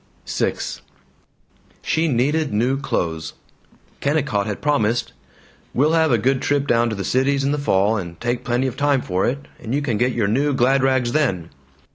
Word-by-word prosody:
VI - - 0 1.3
She 165 0 +1
needed 145 +3 +1
new 120 +6 +1
clothes. 80 - -2 0.7
Kennicott 140 -9 0
had 105 - -3
promised, 120 -6 0 0.6
"We'll 145 +5 +3
have 160 -2 +3
a 120 - +4
good 130 +4 +1
trip 145 -1 +1
down 120 -2 +2
to 110 - -3
the 100 - -4
Cities 135 +2 +1
in 140 - +1
the 150 - -1
fall, 105 -4 +2
and 85 -4 -6
take 120 0 -2
plenty 125 +2 0
of 130 - -2
time 140 -2 +1
for 95 +1 0
it, 140 +3 -3
and 120 +3 -3
you 145 - 0
can 115 -7 -1
get 125 +1 +2
your 110 -4 0
new 140 +6 +1
glad 130 +2 +3
rags 130 -2 +2
then." 105 - 0
130 Hz, 180 wpm, -21 LUFS, 110-140 Hz, 1.3 s, a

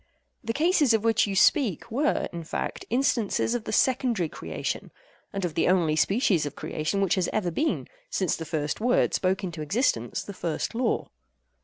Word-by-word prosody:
The 230 - -1
cases 300 - +3
of 220 - -1
which 225 -1 +3
you 195 - -2
speak 210 - +3
were, 290 +6 +1
in 170 -1 -5
fact, 160 - -4
instances 240 -3 +1
of 240 -2 -3
the - - -4
secondary 240 - +2
creation—and 200 - -6
of 170 - -3
the 165 - +1
only 170 -4 +3
species 190 - +2
of 145 - -7
creation 155 +6 -2
which 195 -3 +2
has 185 -3 +1
ever 190 -5 0
been, 310 - -1 0.2
since 185 - 0
the 165 - -6
first 150 +2 -3
word 245 +2 +2
spoke 190 +1 0
into 170 -4 -4
existence 150 - 0
the 200 - -8
first 170 +1 -3
law. 235 0 0
195 Hz, 175 wpm, -26 LUFS, 170-240 Hz, 0.2 s, cases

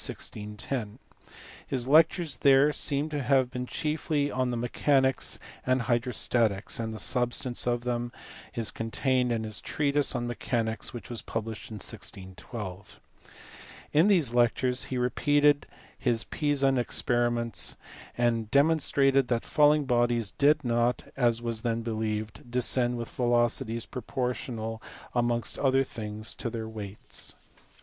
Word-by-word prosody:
His 130 -2 -2
lectures 160 +2 +4
there 140 +2 +5
seem 145 +2 0
to 150 -2 -2
have 130 -1 +2
been 125 0 -4
chiefly 150 -1 -1
on 125 -2 -1
mechanics 130 +2 +1 0.3
and 130 0 +1
hydrostatics, 120 -4 0
and 115 -1 -2
the 110 - -6
substance 120 +2 0
of 120 0 +1
them 120 0 -2 0.4
is 115 -2 -1
contained 125 +2 0
in 115 -1 0
his 110 -2 -4
treatise 145 -1 0
on 120 -1 -1
mechanics 115 -2 -2
which 120 -3 -8
was 115 -3 -4
published 115 -1 -5
in 110 - -7
1612. 95 0 -7 0.9
In 160 +6 +5
these 165 - +3
lectures 125 +1 +2
he 130 - -3
repeated 145 +3 +3 0.3
his 120 -3 +1
Pisan 140 -3 +1
experiments, 120 -4 0 0.4
and 115 -2 +1
demonstrated 140 -2 +3
that 120 -2 0
falling 150 -1 +4
bodies 120 -4 +1
did 145 - +3
not 120 +1 +1
(as 120 -3 +2
was 115 -2 -2
then 115 -1 -1
believed) 110 -1 -3
descend 125 0 +1
with 115 -1 -4
velocities 120 -1 +1
proportional 120 -2 -4 0.3
amongst 120 -1 0
other 135 -1 +3
things 110 -3 -5
to 120 - -4
their 110 -1 -5
weights. 105 -2 -7
120 Hz, 125 wpm, -28 LUFS, 115-135 Hz, 0.9 s, there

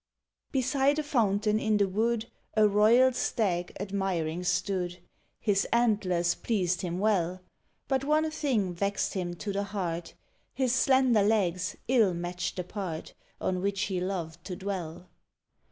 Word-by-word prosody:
Beside 270 +1 +2
a 310 - 0
fountain 215 -6 +1
in 215 -1 +2
the 200 -1 +3
wood 220 +4 0 0.3
A 215 -1 +6
royal 225 +6 +5
Stag 180 -8 -1
admiring 185 -4 -2
stood: 180 0 -1 0.4
His 200 -3 +1
antlers 200 -7 +2
pleased 185 -6 -1
him 175 -2 -3
well. 185 -3 +1 0.5
But 265 -1 +1
one 310 +2 +2
thing 235 - 0
vexed 200 +3 -1
him 175 -2 -3
to 200 +4 -4
the 200 - 0
heart: 175 -5 -4 0.4
His 255 -3 +1
slender 260 -3 +4
legs 185 -4 +1
ill 225 -8 +3
matched 175 0 -3
the 180 - -3
part 180 -4 -5 0.3
On 185 -1 -1
which 200 0 -1
he 190 -5 -1
loved 175 -4 -4
to 185 - -4
dwell. 180 -2 -5
200 Hz, 140 wpm, -29 LUFS, 180-225 Hz, 0.5 s, A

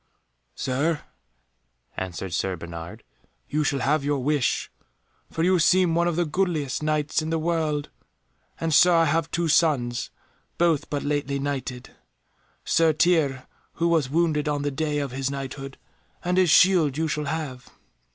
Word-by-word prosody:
"Sir," 145 +5 -1 0.9
answered 95 0 -5
Sir 95 +2 -1
Bernard, 85 +5 -9 0.4
"you 150 +1 0
shall 140 -2 0
have 150 +2 +1
your 145 0 0
wish, 140 0 0 0.6
for 165 - -2
you 185 +1 +3
seem 180 +1 +4
one 170 +1 +2
of 175 - 0
the 175 +1 +1
goodliest 155 -5 -1
Knights 155 0 0
in 155 - -4
the 165 - 0
world. 155 -3 -1 0.7
And, 165 -1 -1
Sir, 180 +4 +6
I 165 0 +4
have 165 +1 0
two 170 0 -1
sons, 140 -7 +1 0.5
both 165 -4 +1
but 145 -1 -2
lately 145 -1 -1
knighted, 135 -3 -4 0.7
Sir 165 -1 +3
Tirre 150 -6 +2 0.3
who 170 0 0
was 160 -6 +2
wounded 155 -1 +1
on 145 -1 -1
the 145 - -1
day 150 +1 -2
of 140 -3 -2
his 135 +1 -2
Knighthood, 135 0 -6 0.5
and 180 +1 +2
his 185 -2 +4
shield 165 -5 +5
you 160 0 0
shall 150 0 -2
have. 140 -4 -5
150 Hz, 155 wpm, -25 LUFS, 135-165 Hz, 0.9 s, Sir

